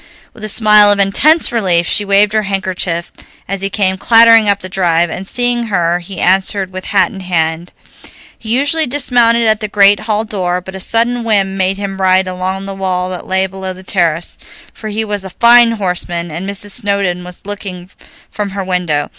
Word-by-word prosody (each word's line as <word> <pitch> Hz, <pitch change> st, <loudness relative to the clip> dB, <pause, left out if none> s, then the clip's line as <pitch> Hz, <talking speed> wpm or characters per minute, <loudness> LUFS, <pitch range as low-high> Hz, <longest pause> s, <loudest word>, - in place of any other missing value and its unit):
With 215 Hz, -, -14 dB
a -, -, -2 dB
smile 210 Hz, -1 st, +5 dB
of 205 Hz, -, +2 dB
intense 290 Hz, +12 st, +3 dB
relief 185 Hz, -7 st, +1 dB
she 205 Hz, -, +2 dB
waved 200 Hz, +1 st, +2 dB
her 215 Hz, -, +2 dB
handkerchief 185 Hz, -4 st, -3 dB, 0.4 s
as 195 Hz, 0 st, -4 dB
he 195 Hz, -, -1 dB
came 190 Hz, -2 st, -1 dB
clattering 230 Hz, -1 st, +5 dB
up 200 Hz, 0 st, 0 dB
the 185 Hz, -, -6 dB
drive, 175 Hz, -2 st, 0 dB
and 190 Hz, -, -6 dB
seeing 245 Hz, 0 st, 0 dB
her 175 Hz, -4 st, 0 dB
he 180 Hz, 0 st, -9 dB
answered 190 Hz, +1 st, 0 dB
with 185 Hz, 0 st, -7 dB
hat 200 Hz, -, +1 dB
and 195 Hz, -3 st, -9 dB
hand. 170 Hz, -1 st, -2 dB, 0.6 s
He 220 Hz, -, -11 dB
usually 285 Hz, +6 st, +1 dB
dismounted 240 Hz, -3 st, +2 dB
at 215 Hz, -1 st, +2 dB
the 215 Hz, -, -4 dB
great 205 Hz, 0 st, +4 dB
hall 215 Hz, 0 st, -2 dB
door, 180 Hz, -4 st, -2 dB
but 190 Hz, +1 st, -11 dB
a 190 Hz, -, -7 dB
sudden 235 Hz, +4 st, 0 dB
whim 200 Hz, -4 st, 0 dB
made 190 Hz, 0 st, -1 dB
him 195 Hz, -1 st, -5 dB
ride 185 Hz, 0 st, +3 dB
along 185 Hz, +1 st, -4 dB
the 195 Hz, -, -5 dB
wall 185 Hz, -1 st, -3 dB
that 180 Hz, -, -7 dB
lay 190 Hz, 0 st, +1 dB
below 190 Hz, 0 st, -5 dB
the 185 Hz, +1 st, -12 dB
terrace, 170 Hz, -4 st, -1 dB, 0.3 s
for 220 Hz, -, -9 dB
he 215 Hz, +1 st, -3 dB
was 205 Hz, -2 st, -3 dB
a 190 Hz, -, -7 dB
fine 235 Hz, 0 st, +6 dB
horseman, 175 Hz, -4 st, -3 dB
and 175 Hz, +5 st, -5 dB
Mrs. 200 Hz, +1 st, -2 dB
Snowdon 200 Hz, -5 st, -1 dB
was 180 Hz, +3 st, -10 dB
looking 190 Hz, -3 st, -7 dB, 0.4 s
from 205 Hz, -1 st, -4 dB
her 195 Hz, -, -2 dB
window. 180 Hz, -5 st, -2 dB
195 Hz, 195 wpm, -13 LUFS, 185-215 Hz, 0.6 s, fine